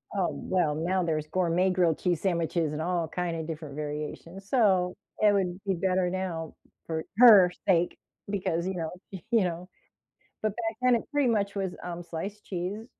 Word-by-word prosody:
Oh, 190 -3 +1
well, 165 -5 0
now 180 +3 0
there's 155 -2 -1
gourmet 180 +2 +1
grilled 175 -4 +2
cheese 175 -4 0
sandwiches 170 -3 0
and 155 - -3
all 170 -1 0
kinda 170 -1 -3
different 155 -3 -6
variations, 150 +5 -6
so 190 -8 +3 0.2
it 210 -1 +5
would 185 -2 0
be 195 - +1
better 185 0 +1
now 175 -4 -3 0.3
for 160 -1 -3
her 210 -7 +9 0.2
sake 175 -2 +2 0.3
because, 180 -3 -1
you 190 - -2
know, 165 -2 -3 0.2
you 215 +3 0
know? 175 +1 -4 0.7
But 215 - +1
back 225 -1 -3
then 250 -1 +5
it 230 - -2
pretty 290 -4 +2
much 200 -2 0
was, 190 -2 -2
um, 175 0 -5
sliced 195 +5 -6
cheese, 195 +5 -4
180 Hz, 170 wpm, -28 LUFS, 165-195 Hz, 0.7 s, her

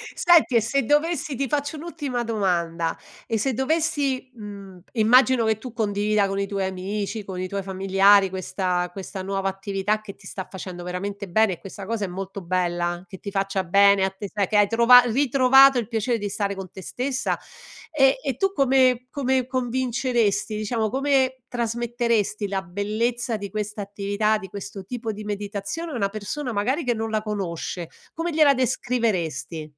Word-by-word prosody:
Senti 340 -8 +5
e 230 - +5
se 270 +5 0
dovessi 295 +1 +1
ti 275 +2 -1
faccio 290 +2 -1
un'ultima 290 -7 -4
domanda, 170 -7 -1 0.3
e 225 - 0
se 260 +4 0
dovessi 275 -2 0
mhmm, 200 -4 -10
immagino 240 +1 +4
che 220 -1 +2
tu 240 +1 -9
condivida 210 -2 +1
con 195 0 -2
i 200 - -1
tuoi 195 -1 -2
amici, 200 +3 -3
con 190 -2 -6
i 185 - -2
tuoi 200 +1 -3
familiari 195 +1 +4
questa 180 -1 -2
questa 190 0 -7
nuova 195 0 -1
attività 195 +2 -2
che 200 -2 -10
ti - - -19
sta 190 - -6
facendo 180 -2 -7
veramente 200 +3 -5
bene 215 +2 +3
e - - -9
questa 195 0 -9
cosa 220 -1 -2
è - - -5
molto 195 +2 -6
bella, 175 0 -1
che 190 - -10
ti 200 - -6
faccia 195 -1 -1
bene 200 +2 +5
a - - 0
te, 195 +1 -8
sai 200 -3 +1
che 210 - +1
hai 205 -1 +5
trovato 235 +1 +6
ritrovato 270 0 +6
il 225 -4 -1
piacere 230 +1 0
di 205 -1 -4
stare 200 0 -2
con 190 -2 -8
te 190 - -10
stessa; 260 +7 -2 0.5
e 270 -3 +4
e 270 -4 -1
tu 390 0 +1
come 255 -3 +3
come 265 -3 0
convinceresti 245 -4 0
diciamo, 215 0 -1
come 265 0 +1
trasmetteresti 235 -3 -1
la 195 -1 -2
bellezza 215 +5 -2
di 200 -1 -6
questa 210 0 -4
attività, 205 +2 0
di 195 -2 -8
questo 195 -1 -7
tipo 230 -1 -4
di 210 0 -8
meditazione 205 +10 -4
a - - -5
una 200 -4 0
persona 245 +6 -4
magari 260 +10 0
che 245 -1 +1
non 225 0 -3
la 215 -1 0
conosce? 180 -5 -4 0.2
Come 335 +1 -2
gliela 300 -3 +5
descriveresti? 225 - -1
215 Hz, 175 wpm, -24 LUFS, 195-250 Hz, 0.5 s, trovato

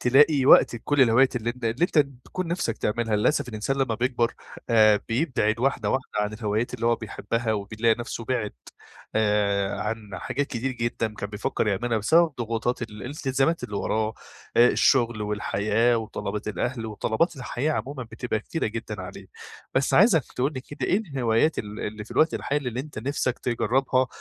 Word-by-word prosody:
تلاقي 140 +2 +5
وقتك - - +7
لكل 145 +4 +1
الهوايات 130 +2 +4
اللي 120 0 -1
أنت 125 0 -9
اللي 115 +6 -1
أنت 175 - +1
بتكون 140 +5 -1
نِفسَك 165 -10 -2
تعملها، 110 0 0
للأسف 125 +5 +1
الإنسان 110 +4 -2
لما 130 -4 0
بيكبر 120 0 0 0.4
آآ، 110 -2 +5
بيبعد 115 -4 0
واحدة 135 +3 0
واحدة 130 0 -1
عن 105 0 -1
الهوايات 110 +1 -2
اللي 115 - -2
هو 115 0 +3
بيحبها، 115 +1 -2
وبيلاقي 110 +2 +1
نفسه 120 -1 -5
بِعِد 115 -3 -1 0.6
آآ، 105 -2 +1
عن 110 +1 -1 0.2
حاجات 130 +10 -2
كتيرة 130 +1 -3
جدًا 115 -2 -1
كان 100 -1 -6
بيفكر 105 +1 -2
يعملها 115 +3 0
بسبب 160 +9 +4
ضغوطات 115 +1 -2
ال 115 - -5
الالتزامات 135 +2 -1
اللي 105 -4 -5
وراه، 110 +1 -1 0.4
آآ، 120 +1 +7
الشغل 120 -5 +2
والحياة 105 +3 +1
وطلبات 110 -1 -4
الأهل 115 +2 -2
وطلبات 110 - 0
الحياة 130 +3 -2
عمومًا 140 -2 -4
بتبقى 115 -1 -4
كتيرة 165 +9 -3
جدًا 110 -2 -5
عليه، 90 - -9 0.5
بس 130 +1 +2
عايزك 180 - +5
تقول 135 +4 +1
لي 130 - -5
كده 145 +3 -5
إيه 190 - +3
الهوايات 140 - +1
ال 105 +1 -5
اللي 105 0 -5
في - - -18
الوقت 160 +1 +3
الحالي 140 -2 -1
اللي 120 +1 -3
أنت 145 -3 -8
نفسك 130 +1 -1
تجرّبها، 130 +2 +1
120 Hz, 170 wpm, -25 LUFS, 110-135 Hz, 0.6 s, وقتك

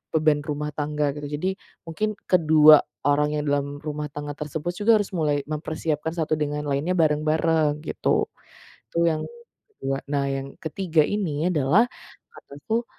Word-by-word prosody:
beban 155 -1 +3
rumah 150 0 -4
tangga 150 0 -1
gitu. 145 +1 -6
Jadi 190 +4 -2 0.3
mungkin 215 +6 -2
kedua 155 -3 +7 0.3
orang 150 +1 +2
yang 150 - -1
dalam 145 0 -2
rumah 150 -1 -4
tangga 145 0 -6
tersebut 150 +3 -4
juga 225 +2 +5
harus 205 -2 0
mulai 150 -5 0
mempersiapkan 155 +1 -3
satu 155 -2 -1
dengan 150 0 -2
lainnya 145 +6 0
bareng-bareng 155 -1 +2
gitu, - - 0 0.6
itu - - -2
yang 155 -1 -1 0.6
ke-2. 135 0 -1 0.2
Nah 140 -1 +1
yang 135 0 -4
ke-3 165 -1 +1
ini 175 -6 -1
adalah 175 - +3 0.4
kataku, 220 - -4
150 Hz, 145 wpm, -24 LUFS, 145-165 Hz, 0.6 s, kedua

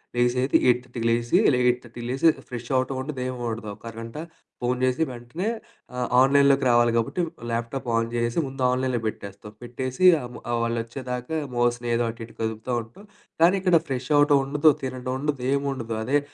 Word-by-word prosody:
లేసేది 125 +2 +2
8:30కి 125 -1 0
లేసి 120 +7 +2 0.2
8:30కి 125 -1 -1
లేసి 135 +5 +2 0.2
ఫ్రెషవటం 130 +2 -2
ఉండదు, 135 0 -5
ఏముండదు. 120 -3 -4
ఒక - - -26
అరగంట 115 +3 -8 0.4
ఫోన్ 125 +1 0
జేసి 130 +5 +2
వెంటనే 125 - -4 0.5
ఆహ్, 125 -1 -1
ఆన్‍లైన్‍లోకి 140 0 +4
రావాలి 120 0 +4
కాబట్టి 115 +10 0 0.3
ల్యాప్‍టాప్ 120 +3 -3
ఆన్ 115 0 0
చేసేసి 120 +6 0
ముందు 135 0 -5
ఆన్‍లైనులో 130 -2 0
పెట్టేస్తాం. 100 0 -7
పెట్టేసి 130 +6 -4 0.2
ఆహ్, 125 0 -8 0.3
వాళ్ళు 115 0 -1
వచ్చేదాకా 125 +4 -5 0.2
మౌస్ 120 0 +2 0.2
ఏదో 120 0 +1
అటు 115 0 -10
ఇటు 115 - -18
కదుపుతా 110 +2 -3
ఉంటాం. 120 - -16 0.4
కానీ 175 +3 +6
ఇక్కడ 180 -3 +5
ఫ్రెషవడం 145 +3 +3
ఉండదు. 145 +3 +4
తినడం 130 -1 -4
ఉండదు. 145 -2 -2
ఏముండదు. 135 -5 -2
అదే 140 +6 +2
125 Hz, 150 wpm, -25 LUFS, 120-135 Hz, 0.5 s, కానీ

